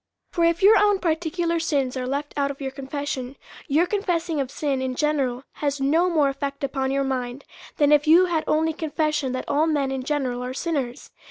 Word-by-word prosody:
For 340 - 0
if 335 +2 +1
your 420 +1 +7
own 410 -1 +4
particular 335 0 -1
sins 280 -6 0
are 255 -1 -3
left 285 +2 -3
out 280 -1 +1
of 280 - -6
your 270 -1 -4
confession, 270 -1 -5 0.3
your 310 +5 +3
confessing 350 -5 -1
of 265 - -3
sin 275 -2 -2
in 260 -1 -2
general 275 -4 0 0.2
has 285 -1 0
no 320 +7 +2
more 310 -5 +3
effect 275 +1 -4
upon 265 -1 -1
your 275 +1 +1
mind, 255 0 -3 0.3
than 290 -1 +4
if 295 0 +4
you 340 +4 +7
had 330 -3 0
only 320 +1 +2
confessed 305 -3 -1
that 255 - -3
all 300 +3 +2
men 285 -4 0
in 265 -1 -2
general 255 -3 -2
are 255 +1 -5
sinners. 275 -7 -3
290 Hz, 200 wpm, -24 LUFS, 270-325 Hz, 0.3 s, your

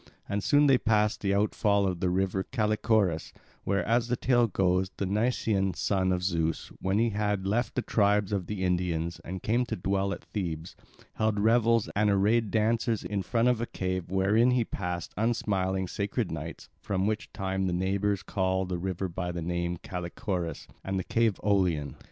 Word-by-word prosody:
And 100 0 -2
soon 145 +8 +4
they 135 -3 +5
passed 105 -1 +1
the 100 -1 +1
outfall 100 0 +2
of 90 -3 -1
the 90 0 +1
river 95 +1 0
Callichorus, 105 -6 0 0.3
where, 100 0 +1
as 115 +1 +2
the 125 - +1
tale 120 -1 +3
goes, 95 -1 +1
the 100 - -1
Nysean 105 -2 0
son 95 -2 +1
of 90 -1 0
Zeus, 80 -3 -1
when 95 +2 +1
he 115 +1 +2
had 105 -2 -1
left 115 +5 0
the 125 - 0
tribes 105 -2 +2
of 95 -4 -1
the 105 -3 -3
Indians 85 -2 -1
and 95 +1 -6
came 120 +3 +2
to - - -2
dwell 95 +2 0
at - - -5
Thebes, 85 -5 -5 0.4
held 110 -1 +1
revels 115 +1 +3
and 105 +1 +3
arrayed 105 +3 +2
dances 110 +1 +1
in 100 -1 -2
front 115 +5 +1
of 125 -2 +2
a 120 - -2
cave, 95 -1 -3
wherein 100 +6 +3
he 125 -2 +2
passed 90 -4 -4
unsmiling 95 -4 0
sacred 100 +2 -2
nights, 80 +1 -6
from 95 -1 -1
which 110 +1 -2
time 95 -1 -2
the - - 0
neighbours 95 +2 0
call 95 -1 0
the 90 -1 -3
river 95 +1 -2
by 90 0 -4
the 85 -1 -4
name 85 0 -1
of - - -16
Callichorus 90 -1 -4 0.2
and 95 0 -2
the 95 - -1
cave 115 -1 +1
Aulion. 90 -8 +1
100 Hz, 185 wpm, -28 LUFS, 90-110 Hz, 0.4 s, they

